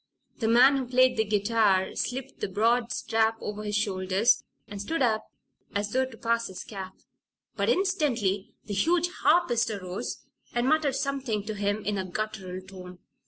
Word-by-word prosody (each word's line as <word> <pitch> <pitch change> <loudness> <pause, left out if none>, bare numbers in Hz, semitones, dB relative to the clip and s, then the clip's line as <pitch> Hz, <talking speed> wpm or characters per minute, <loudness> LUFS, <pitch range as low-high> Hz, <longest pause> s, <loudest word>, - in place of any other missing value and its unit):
The 225 - 0
man 250 +5 +6
who 260 -2 -3
played 255 +1 +4
the 220 - +2
guitar 205 -2 +2
slipped 265 +2 -4
the - - -1
broad 230 +5 +1
strap 225 -2 +1
over 210 0 -5
his 210 -1 -3
shoulders 195 +1 +2 0.2
and 200 -1 -6
stood 320 +6 -1
up 220 -3 +1 0.5
as 205 +1 -1
though 260 +2 +1
to 245 -3 -13
pass 230 0 0
his 190 - -8
cap. 190 -3 -8 0.6
But - - 0
instantly 255 - 0
the 210 - -5
huge 340 - +2
harpist 240 -10 +3
arose 185 -3 -5 0.3
and 240 +1 +1
muttered 300 -2 +2
something 270 -7 -2
to 215 +1 -4
him 205 0 -1
in 205 0 0
a 190 - -2
guttural 185 -2 -5
tone. 180 -1 -10
220 Hz, 165 wpm, -27 LUFS, 200-250 Hz, 0.6 s, man